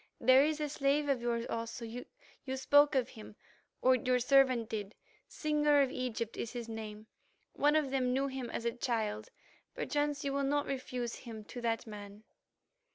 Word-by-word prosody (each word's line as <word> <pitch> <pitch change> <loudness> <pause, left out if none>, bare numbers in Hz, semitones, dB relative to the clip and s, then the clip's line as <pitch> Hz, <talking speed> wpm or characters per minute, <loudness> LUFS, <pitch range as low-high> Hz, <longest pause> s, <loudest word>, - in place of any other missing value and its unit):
There 260 +1 +6
is 310 +1 0
a 300 - -1
slave 285 +1 +1
of 265 -3 +1
yours 235 -1 -1
also—you 230 +3 -6
spoke 290 +2 +5
of 255 -3 +1
him, 215 -1 -11 0.5
or 260 - +6
your 255 0 +2
servant 255 -2 +4
did—Singer 290 +8 -1
of 265 - -1
Egypt 240 -3 -3
is 230 - -4
his 240 -2 -5
name. 215 -1 -7 0.5
One 295 +1 +3
of 300 -4 +2
them 255 -2 +1
knew 270 +2 +1
him 265 -3 -4
as 235 - -4
a 235 - +2
child; 220 -3 -2 0.5
perchance 290 -1 -1
you 275 - -1
will 280 - 0
not 285 +1 +1
refuse 255 -3 -3
him 225 -3 -9
to 245 +4 -8
that 230 0 -1
man." 205 -1 -10
255 Hz, 165 wpm, -33 LUFS, 230-275 Hz, 0.5 s, There